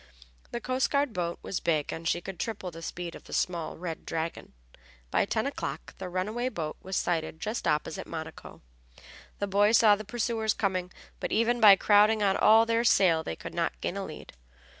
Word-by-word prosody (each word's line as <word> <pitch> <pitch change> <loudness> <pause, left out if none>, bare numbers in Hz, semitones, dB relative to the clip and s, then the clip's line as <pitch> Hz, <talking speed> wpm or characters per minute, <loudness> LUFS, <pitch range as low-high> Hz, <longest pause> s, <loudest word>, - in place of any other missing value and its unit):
The 240 - -4
coast 255 +2 0
guard 280 -4 +1
boat 170 -1 -2
was 190 - -3
big 155 -3 0
and 165 0 -5
she 175 - +1
could 190 -1 -8
triple 205 -5 -4
the 165 0 -10
speed 170 +1 -5
of - - -12
the - - -10
small 170 -3 -1
Red 165 -1 -6
Dragon. 165 0 -4 0.6
By - - +2
ten - - -1
o'clock - - -5
the 185 -1 -5
runaway 215 +8 -2
boat 155 -9 -4
was 190 +1 -5
sighted 160 -3 -1
just 215 +6 -3
opposite 150 0 -1
Monaco. - - -8 0.7
The 200 - -1
boys 205 +3 +4
saw 215 -2 +6
the 215 - -7
pursuers 220 0 -1
coming, 185 -3 -1 0.3
but - - -4
even 235 +2 +2
by 205 -2 +10
crowding 210 +2 +4
on 195 -1 +3
all 225 +1 +6
their 230 0 +1
sail 180 -8 +4
they 80 - -4
could - - -9
not - - -2
gain - - -3
a - - -3
lead. - - -9
195 Hz, 195 wpm, -28 LUFS, 170-220 Hz, 0.7 s, by